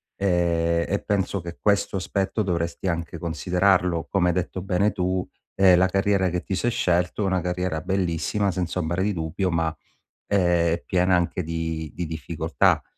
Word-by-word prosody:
ehm, 85 -3 +1
e 100 - 0
penso 100 -1 0
che 85 0 -8
questo 100 -1 +1
aspetto 95 +3 -1
dovresti 85 -1 -2
anche 85 -1 -2
considerarlo. 90 +1 +1
Come 90 -3 +2
hai - - +2
detto 90 +1 -2
bene 95 +3 +1
tu, 90 -1 -1 0.3
ehm, 95 -2 +6
la 90 +1 +4
carriera 95 0 +1
che 90 0 -2
ti 95 - -3
sei 120 +6 0
scelto 90 0 0
è - - 0
una 95 -1 +1
carriera 90 -2 -2
bellissima, 95 +2 0
senza 90 0 -2
ombra, 85 +1 -1
di 105 +2 +1
dubbio 85 +3 -2
ma, 80 -1 0 0.5
ehm, 85 -4 +2
piena 90 0 +3
anche 90 +1 -1
di 80 -1 -3
di 90 - -3
difficoltà, 80 -4 0
90 Hz, 165 wpm, -24 LUFS, 85-95 Hz, 0.5 s, ehm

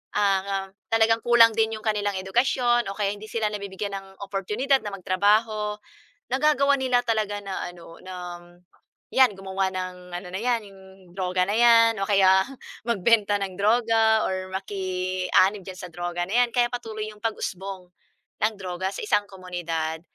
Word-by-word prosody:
ah, 195 -1 +1 0.2
talagang 225 0 +3
kulang 235 -1 +6
din 225 0 +2
'yong 215 - -14
kanilang 205 -2 0
edukasyon 240 +4 +1
o - - -8
kaya 205 -1 0
hindi 205 +1 -10
sila 220 -2 0
nabibigyan 200 0 -5
ng 195 0 -10 0.2
oportunidad 210 +8 0
na 210 - -4
magtrabaho, 210 +3 +1 0.5
nagagawa 280 0 +3
nila 255 -2 +2
talaga 215 -3 0
na 195 -1 -4
ano, 170 -1 -14
na, 185 - -8 0.3
um, - - -17 0.7
‘yan 260 -4 +5
gumawa 195 0 -2
ng 180 -1 -6
ano 180 +1 -8
na 190 - -2
‘yan, 240 0 +1
yung 195 -1 -16 0.4
droga 185 -1 +1
na 200 - -2
‘yan 230 -1 +6
o 195 - -1
kaya 190 -2 +5 0.5
magbenta 210 -1 +3
ng 195 -1 -3
droga 225 0 +3
or 185 0 -3
maki-anib 185 0 0
diyan 185 0 -9
sa 180 - -7
droga 175 0 -3
na 220 +7 +2
‘yan. - - -11
Kaya 240 -1 +4
patuloy 220 -3 -4
yung 210 - -20
pag-usbong 190 -4 -4 0.5
ng 215 +1 +2
droga 185 0 -3
sa - - -6
isang 205 -1 +2
komunidad. 170 -4 -4
200 Hz, 160 wpm, -25 LUFS, 185-225 Hz, 0.7 s, kulang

